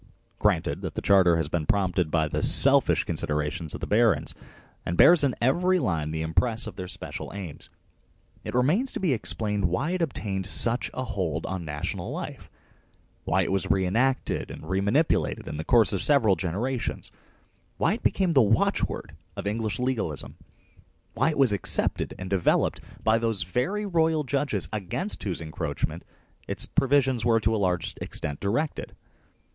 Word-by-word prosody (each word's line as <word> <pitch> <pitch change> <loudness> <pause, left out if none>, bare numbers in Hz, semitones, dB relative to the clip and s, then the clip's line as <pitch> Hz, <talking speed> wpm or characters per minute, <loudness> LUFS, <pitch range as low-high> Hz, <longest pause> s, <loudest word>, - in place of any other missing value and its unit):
Granted - - 0
that - - -6
the - - -3
Charter 95 -4 +5
has 80 -3 -1
been 75 -1 -3
prompted 90 -4 +1
by 80 -1 +1
the - - -2
selfish - - +5
con - - -4
siderations 75 +2 -1
of - - -9
the - - -2
barons, 110 -2 +2 0.5
and 85 - -3
bears 170 -3 +7
in 135 -3 +1
every 180 +9 +2
line 80 - -1
the 80 0 -3
impress 110 +9 0
of 110 -4 -8
their 90 -1 -6
special - - -7
aims, 90 -7 -8 0.7
it - - -6
remains 165 - +2
to - - -4
be 180 -8 +1
explained 105 -3 -1
why 90 - -1
it 185 -1 -2
obtained 100 - -2
such 120 +4 +4
a 130 - -3
hold 85 - -3
on 95 -3 -4
national 75 -1 -4
life, - - -7 0.8
why 95 +3 +2
it - - -3
was 95 0 -1
re 95 -1 +2
enacted 125 +8 0
and - - -9
remanipulated 100 - 0
in - - -5
the 80 - -4
course 115 +3 +3
of 95 - -1
several 120 -10 +3
generations, 105 +9 -3 0.7
why - - +2
it - - -5
became 185 -3 +1
the 140 -5 +5
watchword 110 0 0 0.2
of 100 - -6
English 110 +1 -2
legalism, 120 - -3 0.8
why - - +1
it 155 - -3
was 135 -6 +5
accepted 100 - +3
and 95 - -7
developed 95 -2 +1 0.2
by 110 +1 +3
those 115 -5 0
very 185 - -2
royal 160 -4 +1
judges 140 -6 -1
against 110 - -2
whose 90 -5 -3
encroach 80 -2 -3
ments - - -10 0.4
its - - -1
provisions 135 -3 +1
were 115 -1 +3
to 110 +1 +1
a 105 - -1
large 90 -2 0
extent 70 -1 -3
directed. 130 +10 -2
105 Hz, 170 wpm, -26 LUFS, 90-130 Hz, 0.8 s, bears